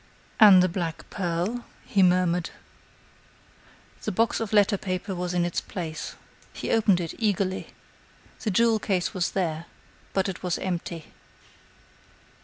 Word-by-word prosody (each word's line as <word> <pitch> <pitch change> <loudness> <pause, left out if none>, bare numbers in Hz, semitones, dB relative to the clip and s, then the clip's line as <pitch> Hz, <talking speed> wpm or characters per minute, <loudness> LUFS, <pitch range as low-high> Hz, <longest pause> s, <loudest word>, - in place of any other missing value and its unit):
"And 200 -5 +9
the - - +4
black 170 -2 -4
pearl?" 185 +6 -2 0.2
he 235 -6 +2
murmured. 180 -1 +3 1.5
The 215 - -2
box 225 +4 +1
of 225 -3 -3
letter 205 0 +4
paper 185 +1 -3
was 180 0 -3
in 175 -1 +2
its 175 - -1
place. 160 -4 -6 0.4
He - - -4
opened 215 -5 +4
it, 170 -2 -4
eagerly. 195 -4 0 0.7
The 220 - -2
jewel 225 +2 +3
case 190 -4 -1
was 180 -3 -1
there, 170 -3 -2 0.5
but 190 0 +1
it 190 -2 -5
was 180 -2 -1
empty. 170 -3 -4
185 Hz, 135 wpm, -26 LUFS, 175-205 Hz, 1.5 s, And